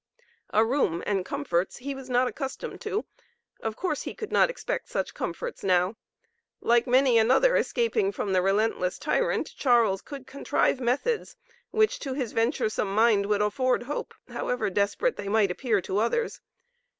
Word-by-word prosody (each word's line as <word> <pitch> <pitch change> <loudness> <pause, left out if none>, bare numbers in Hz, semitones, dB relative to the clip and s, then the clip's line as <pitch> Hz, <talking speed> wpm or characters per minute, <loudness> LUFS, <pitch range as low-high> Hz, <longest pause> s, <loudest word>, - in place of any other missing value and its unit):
A 220 +1 +3
room 225 - 0
and 195 -3 0
comforts 170 +2 -2
he 275 +3 -5
was 270 -1 -9
not 250 +1 +3
accustomed 265 +1 -5
to. 425 0 -2 0.5
Of 220 -1 -3
course 310 -2 -2
he - - -6
could 435 - -6
not - - +4
expect - - -4
such - - -2
comforts - - -5
now. 185 +1 +2 0.6
Like 235 +2 +3
many 255 -1 +5
another 265 - +4
escaping 455 -4 +1
from 200 - -3
the 185 - +4
relentless 195 -1 +1
tyrant, - - 0
Charles 230 -7 +3
could 275 -3 -9
contrive 275 -1 0
methods 280 - -1 0.3
which 435 -1 +2
to 270 -3 -4
his 255 -5 -2
venturesome 220 -4 0
mind 215 -3 +4
would 210 0 +2
afford 250 +4 +1
hope, 285 +4 -5
however 220 -5 -2
desperate 205 - 0
they 200 - -5
might 205 -3 +3
appear 215 +2 0
to 190 +3 -1
others. 450 - -1
240 Hz, 160 wpm, -27 LUFS, 205-280 Hz, 0.6 s, many